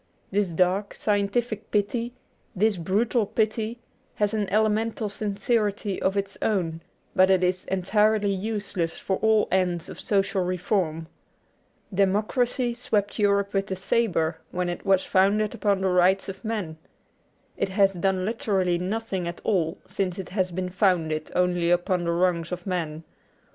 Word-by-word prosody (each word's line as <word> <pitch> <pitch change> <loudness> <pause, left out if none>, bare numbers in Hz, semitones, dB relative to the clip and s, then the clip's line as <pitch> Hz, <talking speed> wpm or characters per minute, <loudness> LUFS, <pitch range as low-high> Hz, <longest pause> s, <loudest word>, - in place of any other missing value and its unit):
This 200 -1 +1
dark, 185 +4 +1
scientific 210 +2 -1
pity, 230 +4 -1 0.4
this 205 +1 +2
brutal 210 +6 +1
pity, 220 +2 -1 0.4
has 210 0 0
an 210 -3 -1
elemental 215 +1 +1
sincerity 205 0 -1
of 190 +1 +1
its 200 0 -3
own, 170 -6 0 0.3
but 185 0 +5
it 190 -1 +4
is 180 0 0
entirely 205 +2 +2
useless 200 -4 -2
for 190 - -1
all 220 -1 +3
ends 180 -2 0
of - - -9
social 195 -1 +1
reform. 180 -3 -1 0.9
Democracy 225 +6 +1
swept 215 -3 -1
Europe 200 -1 +2
with 195 0 0
the 190 - -2
sabre 185 -4 0
when 180 0 -2
it 175 - -5
was 190 -1 +4
founded 205 +3 +2
upon 205 -4 +1
the 190 - +2
Rights 180 +2 +3
of 195 +3 -7
Man. 210 -8 -3 0.8
It - - -1
has 195 0 +3
done 185 +1 0
literally 195 -5 0
nothing 190 -1 -2
at 170 - -5
all 170 -6 0
since 185 -3 -2
it 190 - -6
has 185 -1 0
been 180 +1 -3
founded 180 -5 +1
only 175 -1 +2
upon 175 0 +1
the 170 - +1
wrongs 170 -1 +1
of 180 - -5
man. 165 -4 -3
195 Hz, 150 wpm, -25 LUFS, 180-210 Hz, 0.9 s, but